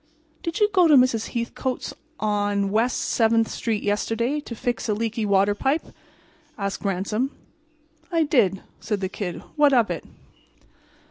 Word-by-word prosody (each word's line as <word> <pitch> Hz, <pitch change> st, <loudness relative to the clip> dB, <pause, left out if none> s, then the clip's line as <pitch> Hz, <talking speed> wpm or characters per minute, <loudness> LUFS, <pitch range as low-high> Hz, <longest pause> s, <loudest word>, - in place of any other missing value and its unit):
"Did 335 Hz, 0 st, -3 dB
you 420 Hz, -, +5 dB
go 365 Hz, -3 st, +6 dB
to 305 Hz, -, +6 dB
Mrs. 250 Hz, -4 st, +3 dB
Hethcote's 240 Hz, +2 st, -3 dB, 0.3 s
on 205 Hz, -2 st, 0 dB
West 230 Hz, +4 st, +1 dB, 0.2 s
7—th 225 Hz, 0 st, +4 dB
street 220 Hz, -3 st, -2 dB
yesterday 225 Hz, +7 st, 0 dB
to 250 Hz, -5 st, -8 dB
fix 240 Hz, 0 st, -2 dB
a 210 Hz, -, +2 dB
leaky 225 Hz, 0 st, -2 dB
water 200 Hz, +1 st, +3 dB
pipe?" 270 Hz, +9 st, -1 dB, 0.6 s
asked 200 Hz, -2 st, -3 dB
Ransom. 200 Hz, +6 st, -1 dB, 0.8 s
"I 330 Hz, -2 st, +3 dB
did," 220 Hz, -, +2 dB, 0.2 s
said 210 Hz, -2 st, -2 dB
the 190 Hz, -, -1 dB
Kid. 185 Hz, -3 st, -5 dB
"What 290 Hz, -2 st, +5 dB
of 235 Hz, -4 st, +3 dB
it?" -, -, -4 dB
225 Hz, 145 wpm, -24 LUFS, 205-255 Hz, 0.8 s, go